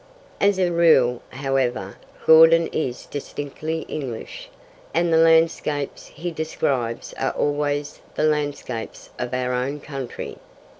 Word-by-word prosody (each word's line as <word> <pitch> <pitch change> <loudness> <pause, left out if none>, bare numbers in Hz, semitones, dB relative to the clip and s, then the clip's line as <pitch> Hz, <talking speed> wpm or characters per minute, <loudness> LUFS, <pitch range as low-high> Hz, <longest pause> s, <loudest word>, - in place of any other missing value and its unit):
As 200 -1 +3
a 180 -2 +2
rule, 145 -8 +4
however, 130 -7 -1 0.3
Gordon 165 +1 +8
is 125 -6 -3
distinctly 145 +3 -5
English, 130 -9 -6 0.5
and 170 0 +2
the - - +5
landscapes 160 -3 +2
he 175 +1 -6
describes 135 -7 -2
are - - 0
always 145 0 -1
the - - 0
landscapes 145 -6 -2
of - - -3
our 125 0 -1
own 130 +4 -2
country. 135 -4 -7
145 Hz, 115 wpm, -23 LUFS, 130-160 Hz, 0.5 s, Gordon